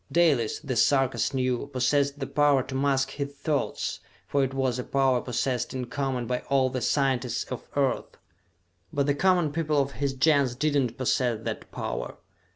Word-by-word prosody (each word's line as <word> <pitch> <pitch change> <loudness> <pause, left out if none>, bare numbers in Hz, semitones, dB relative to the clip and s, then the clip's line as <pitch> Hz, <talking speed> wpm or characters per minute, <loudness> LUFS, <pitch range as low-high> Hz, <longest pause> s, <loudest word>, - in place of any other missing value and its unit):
Dalis, 150 -10 +2
the 130 - -3
Sarkas 130 -4 +2
knew, 130 -1 -1
possessed 140 +1 +1
the 135 - -3
power 145 -2 +3
to 130 - -8
mask 135 0 +1
his 140 0 -5
thoughts, 150 -1 -2 0.3
for 140 -1 +1
it 135 - -1
was 130 -2 -1
a - - -2
power 135 -2 +2
possessed 125 +1 -2
in 130 -1 -2
common 130 -1 -2
by 125 +1 -1
all 135 -2 +3
the 130 -1 -3
scientists 130 -2 +1
of 125 - -6
Earth. 135 -3 0 0.7
But 140 -1 0
the 145 - +2
common 175 -1 +2
people 155 -1 0
of 140 0 0
his 140 -1 -2
Gens 140 -2 +3
did 150 +3 0
not 130 -5 0
posses 120 -3 0
that - - -5
power. - - -4
135 Hz, 175 wpm, -27 LUFS, 125-140 Hz, 0.7 s, power